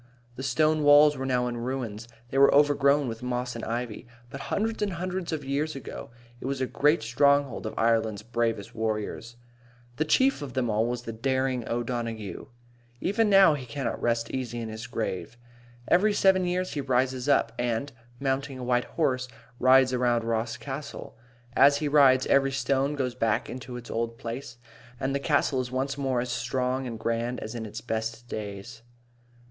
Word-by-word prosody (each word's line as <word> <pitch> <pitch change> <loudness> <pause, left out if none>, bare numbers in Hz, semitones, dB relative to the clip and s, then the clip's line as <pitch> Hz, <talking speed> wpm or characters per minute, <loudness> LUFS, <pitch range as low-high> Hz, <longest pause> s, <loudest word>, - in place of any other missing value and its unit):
The 130 - -7
stone 155 +4 +2
walls 145 0 +7
were 130 0 -4
now 125 -1 +1
in 120 -1 -3
ruins. 120 -3 -4 0.2
They 135 - +1
were 140 - +7
overgrown 145 -1 +4
with 115 -1 -5
moss 125 0 -3
and 115 - -6
ivy. 115 -1 -4 0.2
But 135 - -7
hundreds 220 +1 -1
and 205 -2 0
hundreds 180 +1 -3
of 150 -3 -3
years 145 +3 -1
ago 135 - -8 0.3
it - - -5
was 135 -1 -2
a 130 - +1
great 150 +2 +2
stronghold 140 +1 +2
of - - -7
Ireland's 110 -2 +1
bravest 115 -2 -2
warriors. 110 +1 -3 0.6
The 155 - +2
chief 260 - +3
of 140 -3 -6
them 120 -3 0
all 110 +2 +1
was 120 0 -3
the 115 - -6
daring 130 +1 -1
O'Donaghue. 115 -4 -3 0.5
Even 210 +6 +1
now 195 -5 +7
he 130 -4 -5
cannot 135 +2 -3
rest 115 -1 0
easy 120 -3 -3
in 115 -1 -5
his 110 +2 -7
grave. 115 -1 -4 0.5
Every 205 +4 +4
seven 190 -2 +4
years 180 +1 -1
he 145 - -2
rises 130 0 0
up, 135 -4 +3
and, 120 +3 -1 0.3
mounting 135 0 -2
a 130 - -6
white 125 0 +1
horse, 130 -5 -1 0.3
rides 130 0 +5
around 120 -2 +2
Ross 115 0 -1
Castle. 140 +1 -7 0.4
And - - +4
as 140 0 +5
he 150 - -1
rides 135 -3 +5
every 135 0 +3
stone 135 +2 0
goes 130 -3 -1
back 115 -3 0
into 125 0 -7
its 120 -1 -9
old 115 0 -2
place, 120 +1 -6 0.4
and 135 +1 -1
the 140 - 0
castle 140 -2 +1
is 125 - -5
once 135 +2 -2
more 135 -3 -1
as 125 0 -4
strong 125 +2 -1
and 115 -2 -5
grand 115 +2 -2
as 110 - -6
in 115 -2 -5
its 110 +2 -7
best 115 +1 -4
days. 110 +2 -7
125 Hz, 185 wpm, -27 LUFS, 115-140 Hz, 0.6 s, walls